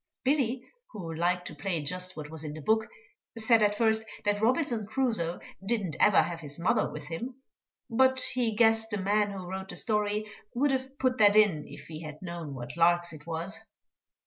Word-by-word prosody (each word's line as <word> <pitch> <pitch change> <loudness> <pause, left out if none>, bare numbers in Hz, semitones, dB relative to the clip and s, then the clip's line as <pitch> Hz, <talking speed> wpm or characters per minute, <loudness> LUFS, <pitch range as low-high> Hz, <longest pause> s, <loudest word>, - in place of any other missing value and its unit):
Billy, 260 -3 +1 0.3
who 175 -6 -6
liked 175 +2 0
to - - -6
play 190 -4 -2
just 180 +4 -3
what 150 0 -7
was 160 -1 -7
in 150 -1 -5
the - - -7
book, 220 +6 +2 0.5
said 225 0 +4
at 205 0 +3
first 220 0 +2 0.2
that 205 0 +1
Robinson 235 -3 +1
Crusoe 220 -8 0 0.2
didn't 195 -6 -1
ever 210 - +6
have 170 -1 -4
his 145 -3 -8
mother 170 +2 +1
with 150 -1 -7
him, 240 +10 -5 0.5
but 260 +3 +3
he 240 -4 0
"guessed 225 0 +4
the 205 - -2
man 205 +2 +2
who 195 -2 -6
wrote 190 +1 -5
the - - -6
story 210 -2 0 0.3
would 280 +3 +2
have 265 +1 -3
put 255 -3 +1
that 205 -1 +6
in 195 -9 +4
if 140 - -11
he 155 +1 -8
had 155 -2 -8
known 170 -5 -6
what 120 +2 -7
larks 175 0 +3
it 155 +1 -12
was." 170 +6 -3
205 Hz, 195 wpm, -29 LUFS, 170-225 Hz, 0.5 s, ever